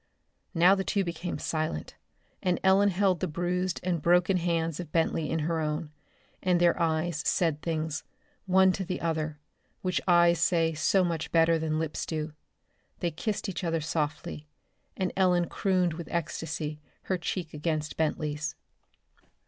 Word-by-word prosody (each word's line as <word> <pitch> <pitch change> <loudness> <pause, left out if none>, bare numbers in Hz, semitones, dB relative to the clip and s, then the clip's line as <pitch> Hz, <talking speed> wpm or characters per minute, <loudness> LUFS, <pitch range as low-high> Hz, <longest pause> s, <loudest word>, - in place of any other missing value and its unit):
Now 175 +3 +6
the 195 -1 0
two 200 +1 +1
became 170 0 -4
silent, 155 - -3 0.5
and 180 -2 +1
Ellen 195 +2 +5
held 190 -2 +2
the 185 - -1
bruised 175 +2 -1
and 175 -3 0
broken 180 +3 +4
hands 165 -2 0
of 170 -4 -6
Bentley 165 -2 +1
in 160 - 0
both 150 - -1
her 165 -1 0
own, 150 0 -2 0.5
and 180 -2 +2
their 175 0 +3
eyes 160 0 0
said 160 -4 +1
things, 155 -1 -2 0.4
one 190 0 +5
to 190 - -2
the 180 0 -3
other, 155 -2 -2 0.4
which 185 -1 0
eyes 170 -1 +5
say 165 -1 +2
so 185 +5 +3
much 165 -3 -2
better 165 0 +4
than 155 -1 -1
lips 160 -1 -2
do. 155 -1 -3 0.7
They 170 - -1
kissed 210 +6 -3
each 185 -2 -4
other 165 -1 0
softly, 150 -1 -3 0.5
and 185 -1 -1
Ellen 180 -2 +3
crooned 185 -3 +1
with 170 +1 -7
ecstasy, 160 -2 -3 0.2
her 185 -1 -1
cheek 170 -1 -3
against 155 0 -2
Bentley's. 150 -1 -1
170 Hz, 155 wpm, -28 LUFS, 155-180 Hz, 0.7 s, Now